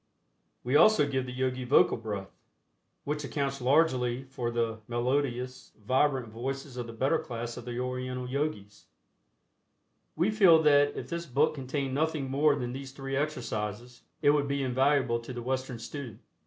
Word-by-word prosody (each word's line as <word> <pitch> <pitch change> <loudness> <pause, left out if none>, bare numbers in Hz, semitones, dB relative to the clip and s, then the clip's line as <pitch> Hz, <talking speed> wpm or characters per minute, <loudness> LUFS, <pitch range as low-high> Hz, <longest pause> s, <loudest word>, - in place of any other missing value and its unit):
We 125 +3 0
also 150 -2 +6
give 130 -2 -1
the - - -5
Yogi 130 0 -2
Vocal 125 +3 +4
Breath, 105 -4 -5 0.7
which 150 +1 -3
accounts 140 -2 -2
largely 130 -3 +2
for 130 -3 -4
the 115 -2 -1
melodious, 125 +1 -2
vibrant 130 -1 +2
voices 135 +4 -5
of 120 -2 -4
the - - -7
better 130 +5 +1
class 120 0 -5
of 120 - -9
the 120 0 -4
Oriental 125 0 -3
Yogis. 125 -7 -3 1.3
We 175 +7 +2
feel 190 -7 +6
that 145 -1 +4
if - - -5
this 170 0 -4
book 140 +4 +2
contained 135 -1 -3
nothing 150 -2 -1
more 145 +1 +3
than 125 -3 -4
these 135 0 -7
three 135 0 -4
exercises, 120 -5 -3 0.2
it 145 - +6
would 145 -1 +1
be 140 0 -1
invaluable 130 -1 +2
to 115 +2 -8
the 120 -1 -6
Western 130 0 -2
student. 120 -1 -7
130 Hz, 160 wpm, -29 LUFS, 120-145 Hz, 1.3 s, also